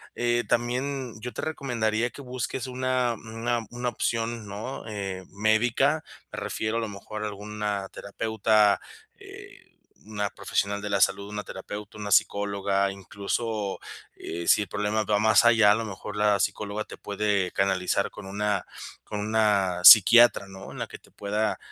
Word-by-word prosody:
eh 120 Hz, 0 st, +1 dB
también 125 Hz, +1 st, -1 dB
yo 125 Hz, +2 st, -5 dB
te -, -, -5 dB
recomendaría 120 Hz, -6 st, -1 dB
que 140 Hz, -, -11 dB
busques 125 Hz, 0 st, -4 dB
una 130 Hz, -1 st, 0 dB
una 115 Hz, +1 st, -3 dB
una 120 Hz, 0 st, -4 dB
opción, 115 Hz, -1 st, -2 dB
¿no?, 105 Hz, +7 st, -6 dB
eh, 95 Hz, -3 st, -5 dB
médica, 115 Hz, +9 st, +2 dB, 0.3 s
me -, -, -4 dB
refiero 110 Hz, +1 st, -3 dB
a -, -, +1 dB
lo 110 Hz, -, -3 dB
mejor 105 Hz, +1 st, -7 dB
a -, -, -1 dB
alguna 105 Hz, -1 st, -4 dB
terapeuta, 110 Hz, 0 st, +1 dB, 0.3 s
eh, -, -, -14 dB, 0.3 s
una 105 Hz, -2 st, -3 dB
profesional 100 Hz, +1 st, -2 dB
de 105 Hz, -, -5 dB
la 100 Hz, -, +1 dB
salud, 100 Hz, +1 st, +2 dB
una 105 Hz, 0 st, -5 dB
terapeuta, 105 Hz, +2 st, -8 dB
una 105 Hz, -1 st, -5 dB
psicóloga. 100 Hz, -1 st, +2 dB
Incluso, 100 Hz, +1 st, -3 dB, 0.4 s
eh, 85 Hz, +1 st, -6 dB
si -, -, +5 dB
el 105 Hz, -, -10 dB
problema 105 Hz, +1 st, -1 dB
va 105 Hz, 0 st, +2 dB
más 110 Hz, +2 st, +5 dB
allá, 115 Hz, -3 st, +6 dB
a -, -, +5 dB
lo 115 Hz, +1 st, -3 dB
mejor, 105 Hz, 0 st, -7 dB
la 105 Hz, -1 st, +3 dB
psicóloga 105 Hz, +1 st, -2 dB
te -, -, -11 dB
puede 100 Hz, -2 st, -1 dB
canalizar 95 Hz, -2 st, +1 dB
con -, -, -10 dB
una 100 Hz, 0 st, -1 dB, 0.4 s
con 105 Hz, -, -5 dB
una 105 Hz, -4 st, +1 dB
psiquiatra, 115 Hz, 0 st, +9 dB
¿no? 95 Hz, 0 st, -10 dB
En -, -, -9 dB
la -, -, -3 dB
que -, -, -11 dB
te -, -, -23 dB
pueda, 105 Hz, +1 st, -2 dB
105 Hz, 165 wpm, -26 LUFS, 100-115 Hz, 0.4 s, psiquiatra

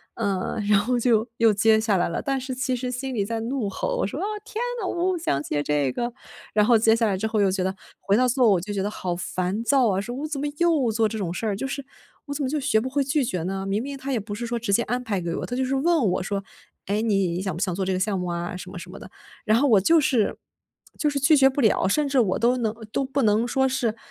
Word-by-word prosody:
“呃， 195 Hz, +2 st, -2 dB
然 205 Hz, -1 st, +5 dB
后 245 Hz, +4 st, 0 dB
就 230 Hz, -2 st, +2 dB
又 225 Hz, -2 st, +4 dB
接 220 Hz, +2 st, +4 dB
下 220 Hz, -2 st, +1 dB
来 175 Hz, -, +1 dB
了。 -, -, -3 dB
但 270 Hz, -1 st, -1 dB
是 260 Hz, 0 st, -4 dB
其 260 Hz, 0 st, -1 dB
实 250 Hz, +1 st, -3 dB
心 260 Hz, +1 st, -4 dB
里 210 Hz, -4 st, 0 dB
在 225 Hz, +2 st, -3 dB
怒 235 Hz, -2 st, -2 dB
吼， 195 Hz, -, -2 dB
我 -, -, 0 dB
说：” 265 Hz, -, -5 dB
啊， -, -, -1 dB, 0.2 s
天 440 Hz, +1 st, -5 dB, 0.2 s
哪， 380 Hz, -, -2 dB
我 -, -, -2 dB, 0.2 s
不 365 Hz, -, -1 dB
想 140 Hz, -, -1 dB
接 145 Hz, -1 st, -1 dB
这 145 Hz, -3 st, +1 dB
个。 240 Hz, -, -2 dB, 0.4 s
“然 210 Hz, -1 st, +4 dB
后 235 Hz, 0 st, +5 dB
接 220 Hz, 0 st, +4 dB
下 230 Hz, -1 st, +1 dB
来 200 Hz, -, +1 dB
之 205 Hz, -, -3 dB
后 220 Hz, -1 st, -1 dB
又 200 Hz, -, +4 dB
觉 185 Hz, -1 st, -1 dB
得 190 Hz, +1 st, -1 dB, 0.3 s
回 200 Hz, +1 st, +2 dB
到 255 Hz, +1 st, +3 dB
座 250 Hz, +1 st, +3 dB
位 -, -, +6 dB
我 185 Hz, -, +2 dB
就 205 Hz, +3 st, -5 dB
觉 195 Hz, -1 st, -1 dB
得 205 Hz, -, -1 dB
好 185 Hz, -4 st, -3 dB
烦 185 Hz, +4 st, -2 dB
躁 260 Hz, 0 st, +3 dB
啊， 190 Hz, 0 st, 0 dB
说 240 Hz, +4 st, -6 dB
我 290 Hz, +4 st, -4 dB
怎 300 Hz, -2 st, -4 dB
么 -, -, -1 dB
又 315 Hz, -9 st, +2 dB
做 220 Hz, 0 st, +2 dB
这 220 Hz, -, -5 dB
种 180 Hz, -4 st, -2 dB
事 225 Hz, -, -4 dB
儿， 205 Hz, -, 0 dB
就 215 Hz, -, -4 dB
是 275 Hz, 0 st, -5 dB, 0.4 s
我 285 Hz, -, -5 dB
怎 285 Hz, 0 st, -3 dB
么 260 Hz, -, -1 dB
就 300 Hz, +2 st, -1 dB
学 220 Hz, -5 st, +2 dB
不 255 Hz, -, -3 dB
会 280 Hz, +1 st, +1 dB
拒 275 Hz, +2 st, +1 dB
绝 180 Hz, -7 st, -2 dB
呢？ 195 Hz, +2 st, -3 dB
明 195 Hz, +2 st, -1 dB
明 280 Hz, +1 st, -5 dB
他 275 Hz, +1 st, -5 dB
也 250 Hz, -, +1 dB
不 205 Hz, 0 st, -7 dB
是 235 Hz, +3 st, -4 dB
说 240 Hz, 0 st, -2 dB
直 220 Hz, -3 st, -1 dB
接 235 Hz, -, +4 dB
安 250 Hz, +1 st, -2 dB
排 205 Hz, -6 st, -2 dB
给 170 Hz, -1 st, -3 dB
我， -, -, -3 dB
他 245 Hz, -, -4 dB
就 260 Hz, -, 0 dB
是 265 Hz, +1 st, -1 dB
问 320 Hz, +2 st, +2 dB
我 -, -, -1 dB
说： 200 Hz, 0 st, -3 dB, 0.4 s
“诶， 205 Hz, +3 st, 0 dB
你 195 Hz, -5 st, +1 dB
想 190 Hz, -4 st, -3 dB
不 170 Hz, -, -6 dB
想 190 Hz, -4 st, 0 dB
做 190 Hz, +1 st, -2 dB
这 190 Hz, -, 0 dB
个 185 Hz, -, -1 dB
项 195 Hz, 0 st, 0 dB
目 180 Hz, -, -3 dB
啊 175 Hz, +1 st, -3 dB
什 180 Hz, 0 st, -9 dB
么 180 Hz, -, -7 dB
什 180 Hz, -, -10 dB
么 195 Hz, -, -9 dB
的。” -, -, -11 dB, 0.4 s
然 215 Hz, +2 st, +4 dB
后 285 Hz, -, +3 dB
我 220 Hz, -6 st, +6 dB
就 325 Hz, -, +4 dB
是 255 Hz, -8 st, +1 dB, 0.6 s
就 300 Hz, -, +1 dB
是 285 Hz, -1 st, -1 dB
拒 285 Hz, +3 st, +5 dB
绝 270 Hz, -1 st, +6 dB
不 270 Hz, +2 st, -2 dB
了， 215 Hz, -4 st, +3 dB
甚 295 Hz, +9 st, +1 dB
至 275 Hz, -1 st, +2 dB
我 200 Hz, -6 st, +1 dB
都 245 Hz, +2 st, +3 dB
能 225 Hz, -3 st, -1 dB, 0.2 s
都 270 Hz, -, 0 dB
不 275 Hz, +1 st, -1 dB
能 220 Hz, +2 st, +3 dB
说 265 Hz, +2 st, +2 dB
是 245 Hz, -4 st, -1 dB
225 Hz, 320 characters per minute, -24 LUFS, 195-265 Hz, 0.6 s, 位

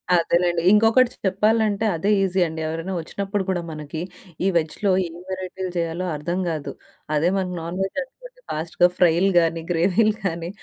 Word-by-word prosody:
అదేనండి. 170 Hz, 0 st, +2 dB
ఇంకొకటి 225 Hz, +4 st, +5 dB
చెప్పాలంటే 215 Hz, +2 st, +2 dB
అదే 165 Hz, +5 st, -1 dB
ఈజీ 190 Hz, 0 st, 0 dB
అండి. 160 Hz, 0 st, -6 dB
ఎవరైనా 165 Hz, +4 st, -4 dB
వచ్చినప్పుడు 200 Hz, +4 st, -3 dB
కూడా 180 Hz, -2 st, 0 dB
మనకి 155 Hz, +1 st, -6 dB, 0.4 s
ఈ -, -, +4 dB
వెజ్‌లో 170 Hz, +5 st, 0 dB, 0.2 s
ఏం 170 Hz, 0 st, -11 dB
వెరైటీలు 185 Hz, 0 st, -4 dB
చేయాలో 170 Hz, +2 st, -2 dB
అర్థం 170 Hz, +5 st, -3 dB
కాదు. 155 Hz, -3 st, -4 dB, 0.4 s
అదే 160 Hz, +4 st, +3 dB
మన 190 Hz, -, -1 dB
నాన్ 170 Hz, +2 st, -5 dB
వెజ్ 195 Hz, -, -5 dB
అనుకోండి -, -, -16 dB
ఫాస్ట్‌గా 165 Hz, +3 st, +2 dB
ఫ్రైలు 180 Hz, +2 st, +4 dB
గానీ, 165 Hz, -1 st, 0 dB
గ్రేవీలు 195 Hz, +6 st, +3 dB
గానీ. 170 Hz, -2 st, -2 dB
180 Hz, 150 wpm, -23 LUFS, 165-200 Hz, 0.4 s, ఇంకొకటి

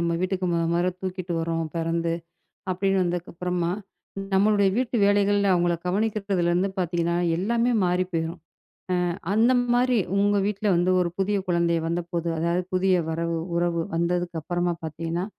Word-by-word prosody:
நம்ம 170 Hz, 0 st, 0 dB
வீட்டுக்குத் 180 Hz, -1 st, 0 dB
தூக்கிட்டு 185 Hz, -2 st, -4 dB
வர்றோம். 165 Hz, 0 st, -1 dB
பிறந்து 165 Hz, 0 st, 0 dB, 0.6 s
அப்படின்னு 195 Hz, +1 st, +1 dB
வந்ததுக்கு 175 Hz, -1 st, -3 dB
அப்புறமா, 180 Hz, 0 st, -1 dB, 0.6 s
நம்மளுடைய 200 Hz, 0 st, +4 dB
வீட்டு 250 Hz, -1 st, 0 dB
வேலைகள்ல, 205 Hz, 0 st, +3 dB
அவங்கள 175 Hz, -1 st, +2 dB
கவனிக்கிறதுல 200 Hz, -2 st, 0 dB
இருந்து 180 Hz, +3 st, +1 dB
பாத்தீங்கன்னா, 170 Hz, -1 st, 0 dB, 0.2 s
எல்லாமே 235 Hz, +6 st, +1 dB
மாறிப் 180 Hz, +1 st, 0 dB
போயிரும். 165 Hz, +1 st, -2 dB, 0.7 s
அ -, -, -2 dB, 0.2 s
அந்த 230 Hz, +4 st, +4 dB, 0.2 s
மாதிரி, 250 Hz, 0 st, +3 dB, 0.2 s
உங்க 205 Hz, 0 st, +3 dB
வீட்டுல 210 Hz, 0 st, -1 dB
வந்து 175 Hz, +2 st, +2 dB
ஒரு 175 Hz, -1 st, 0 dB
புதிய 200 Hz, +1 st, +1 dB
குழந்தை 170 Hz, -1 st, +2 dB
வந்தபோது, 170 Hz, 0 st, -2 dB
அதாவது 170 Hz, +2 st, 0 dB
புதிய 185 Hz, 0 st, +3 dB
வரவு, 165 Hz, +1 st, -1 dB, 0.2 s
உறவு 170 Hz, -1 st, +1 dB
வந்ததுக்கு 175 Hz, 0 st, -1 dB
அப்பறமா 175 Hz, +2 st, -1 dB
பாத்தீங்கன்னா, 165 Hz, +3 st, -3 dB
180 Hz, 135 wpm, -25 LUFS, 170-195 Hz, 0.7 s, நம்மளுடைய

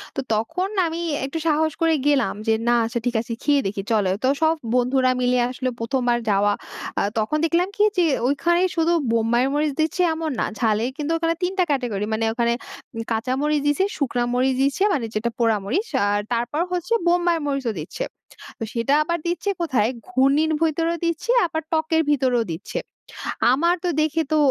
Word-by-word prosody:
তো -, -, -2 dB
তখন 325 Hz, -, -1 dB, 0.2 s
আমি 330 Hz, +1 st, -4 dB, 0.2 s
একটু 275 Hz, +4 st, -4 dB
সাহস 315 Hz, 0 st, +2 dB
করে 330 Hz, 0 st, +4 dB
গেলাম 285 Hz, -2 st, +2 dB
যে 225 Hz, -, +4 dB, 0.2 s
না, 240 Hz, -, +4 dB
আচ্ছা 235 Hz, +1 st, -2 dB
ঠিক 245 Hz, -1 st, -1 dB
আছে, 230 Hz, -, -6 dB
খেয়ে 285 Hz, -1 st, +3 dB
দেখি, 195 Hz, 0 st, -3 dB
চলো 205 Hz, -4 st, +2 dB
তো -, -, +3 dB
সব 320 Hz, 0 st, +4 dB, 0.2 s
বন্ধুরা 255 Hz, +1 st, +3 dB
মিলে 250 Hz, 0 st, +2 dB
আসলো, 255 Hz, 0 st, -2 dB
১ম 240 Hz, +3 st, -1 dB
বার 240 Hz, -, +2 dB
যাওয়া। 205 Hz, 0 st, +3 dB, 0.5 s
আ -, -, +2 dB, 0.2 s
তখন 220 Hz, +8 st, 0 dB
দেখলাম 340 Hz, +3 st, +2 dB
কি 415 Hz, -, +4 dB
যে, 355 Hz, -, +4 dB, 0.2 s
ওইখানেই 345 Hz, +6 st, +2 dB
শুধু 330 Hz, +1 st, +2 dB, 0.2 s
বোম্বাই 230 Hz, +1 st, +2 dB
মরিচ 295 Hz, -1 st, +1 dB
দিচ্ছে 320 Hz, +3 st, 0 dB
এমন 320 Hz, -1 st, -3 dB
না। -, -, +1 dB
ঝালের 220 Hz, +1 st, +1 dB
কিন্তু 300 Hz, +1 st, -2 dB
ওখানে 330 Hz, 0 st, 0 dB
৩ 360 Hz, -, +1 dB
টা -, -, +6 dB
ক্যাটেগরি, 245 Hz, -8 st, -1 dB
মানে 225 Hz, +1 st, 0 dB
ওখানে 235 Hz, 0 st, +1 dB, 0.6 s
কাঁচা 225 Hz, +3 st, 0 dB
মরিচ 300 Hz, 0 st, +1 dB
দিছে, 290 Hz, +6 st, +2 dB
শুকনা 245 Hz, -4 st, 0 dB
মরিচ 260 Hz, +1 st, +2 dB
দিছে, 280 Hz, +8 st, +1 dB
মানে 260 Hz, -9 st, -1 dB
যেটা 215 Hz, +3 st, 0 dB
পোড়া 225 Hz, -2 st, +3 dB
মরিচ, 390 Hz, -, -1 dB, 0.2 s
আর 205 Hz, 0 st, +1 dB
তারপর 240 Hz, +7 st, -1 dB
হচ্ছে 360 Hz, +4 st, -1 dB
বোম্বাই 345 Hz, -1 st, +3 dB
মরিচও 275 Hz, -5 st, -1 dB
দিচ্ছে। -, -, -5 dB, 0.5 s
তো -, -, -3 dB
সেটা 235 Hz, +3 st, +1 dB
আবার 340 Hz, +2 st, -2 dB
দিচ্ছে 350 Hz, +4 st, -1 dB
কোথায়, 255 Hz, -10 st, +1 dB, 0.2 s
ঘূর্ণির 275 Hz, +5 st, +3 dB
ভিতরে 330 Hz, +1 st, +1 dB
দিচ্ছে, 335 Hz, +8 st, -1 dB, 0.2 s
আবার 320 Hz, -1 st, -3 dB
টকের 320 Hz, 0 st, +2 dB
ভিতরেও 255 Hz, -4 st, +2 dB
দিচ্ছে। 165 Hz, +5 st, -5 dB, 0.7 s
আমার 340 Hz, +6 st, +2 dB
তো -, -, +2 dB
দেখে 315 Hz, +1 st, +1 dB
তো 310 Hz, -, +4 dB
280 Hz, 185 wpm, -22 LUFS, 235-325 Hz, 0.7 s, টা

